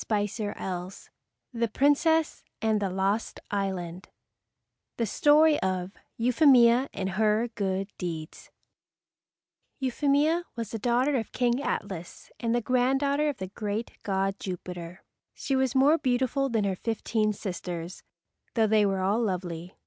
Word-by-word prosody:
[Illustration: 210 0 -1
Headpiece] 185 0 -6 0.4
THE 235 0 0
PRINCESS 295 +6 +2 0.2
OF 220 -1 +2
THE 200 -2 -1
LOST 195 +4 -1
ISLAND 190 -3 -3 0.9
The 230 - +1
Story 300 +7 +4
of 185 0 -1 0.3
Euphemia 250 0 +5
and 190 -1 -3
Her 215 +4 +1
Good 195 -3 -2
Deeds 165 -4 -6 1.3
Euphemia 290 +5 +1
was 230 -3 -5
the 225 - -4
daughter 250 +5 +2
of 225 - -4
King 245 +1 +1
Atlas 190 - -5
and 230 0 0
the 240 - +1
granddaughter 270 +5 +2
of 285 - -4
the 190 -1 -6
great 210 +2 -4
god 195 0 -1
Jupiter. 180 -1 -7 0.3
She 270 - -2
was 265 -1 +1
more 290 +5 +5
beautiful 260 +2 +1
than 225 -3 +1
her 195 -1 0
fifteen 220 +1 -1
sisters, 180 -3 -5 0.5
though 225 -2 +4
they 215 -1 +4
were 195 -1 -1
all 200 +5 +1
lovely. 180 -4 -3
220 Hz, 135 wpm, -27 LUFS, 190-255 Hz, 1.3 s, Euphemia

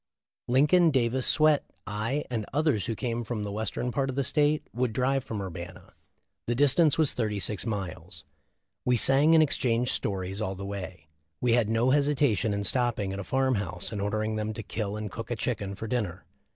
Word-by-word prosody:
Lincoln, 150 +7 +5
Davis, 130 -2 +1
Swett, 155 -1 +4 0.2
I, 110 +8 -2
and 115 -3 -1
others 145 - +1
who 115 - -2
came 120 0 -2
from 110 -2 -4
the 100 - -4
western 110 +4 -2
part 135 +2 -1
of 130 - -3
the 140 - +1
state 150 +2 +1
would 120 -1 -1
drive 135 +1 +1
from 110 -4 -5
Urbana. 90 0 -8 0.5
The 120 - 0
distance 145 +3 +4
was 155 -3 +3
thirty 105 -4 -1
six 105 +3 -2
miles. 90 -4 -5 0.6
We 125 -1 +2
sang 140 +7 +6
and 160 - +7
exchanged 125 -4 +1
stories 95 +1 -3
all 95 -2 -2
the 100 +1 -7
way. 95 -4 -7 0.3
We 125 -2 +2
had 115 -3 +3
no 115 +3 +2
hesi 145 +1 +3
tation 115 -6 +2
in 100 0 -1
stopping 110 -3 0
at 100 - -5
a - - -4
farm 130 +6 +1
house 90 -1 -5
and 105 -3 -3
ordering 110 +2 -1
them 110 0 -2
to 110 - -6
kill 105 0 -4
and 105 -2 -5
cook 115 - -7
a 120 - -1
chicken 105 -4 -3
for 110 - -6
dinner. 105 -6 -3
115 Hz, 200 wpm, -28 LUFS, 100-130 Hz, 0.6 s, and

